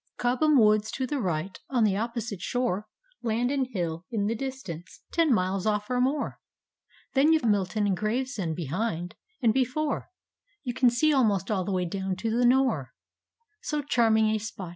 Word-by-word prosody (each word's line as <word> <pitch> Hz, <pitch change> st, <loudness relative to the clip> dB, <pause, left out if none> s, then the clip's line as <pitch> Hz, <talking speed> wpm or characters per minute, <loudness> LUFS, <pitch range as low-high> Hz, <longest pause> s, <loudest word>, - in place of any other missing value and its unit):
Cobham 255 Hz, +5 st, +3 dB
woods 215 Hz, -1 st, +4 dB
to 260 Hz, -, -1 dB
the 290 Hz, +1 st, -2 dB
right, 180 Hz, -3 st, -2 dB
— -, -, -46 dB
on 245 Hz, -4 st, +2 dB
the 205 Hz, -3 st, +3 dB
opposite 230 Hz, -2 st, -3 dB
shore 215 Hz, -3 st, -1 dB, 0.3 s
Landon 245 Hz, +4 st, 0 dB
Hill 170 Hz, -8 st, -3 dB
in 215 Hz, -4 st, -1 dB
the 220 Hz, -, +1 dB
distance, 230 Hz, -9 st, -7 dB
ten 330 Hz, -3 st, +3 dB
miles 190 Hz, -2 st, +1 dB
off 210 Hz, +2 st, 0 dB
or 250 Hz, 0 st, +2 dB
more; 275 Hz, +3 st, 0 dB, 0.7 s
Then 280 Hz, +4 st, +4 dB
you've 315 Hz, -5 st, +3 dB
Milton 205 Hz, 0 st, +1 dB
and 195 Hz, -2 st, +2 dB
Gravescnd 215 Hz, -, -2 dB
behind 175 Hz, -, -3 dB, 0.2 s
— 435 Hz, -, -42 dB
and 225 Hz, -2 st, +5 dB
before 265 Hz, +4 st, -1 dB, 0.5 s
You 250 Hz, -3 st, -3 dB
can 255 Hz, 0 st, +4 dB
see 295 Hz, +6 st, +2 dB
almost 210 Hz, -7 st, +2 dB
all 190 Hz, -4 st, 0 dB
the 200 Hz, -, -2 dB
way 185 Hz, -1 st, 0 dB
down 190 Hz, +1 st, -2 dB
to 220 Hz, +4 st, -2 dB
the 245 Hz, 0 st, +4 dB
Note. 245 Hz, -, +2 dB, 0.4 s
— -, -, -65 dB, 0.3 s
So 300 Hz, -1 st, -2 dB
charming 220 Hz, -5 st, +3 dB
a 215 Hz, -, 0 dB
spot. 200 Hz, -4 st, -6 dB
220 Hz, 185 wpm, -27 LUFS, 195-255 Hz, 0.7 s, and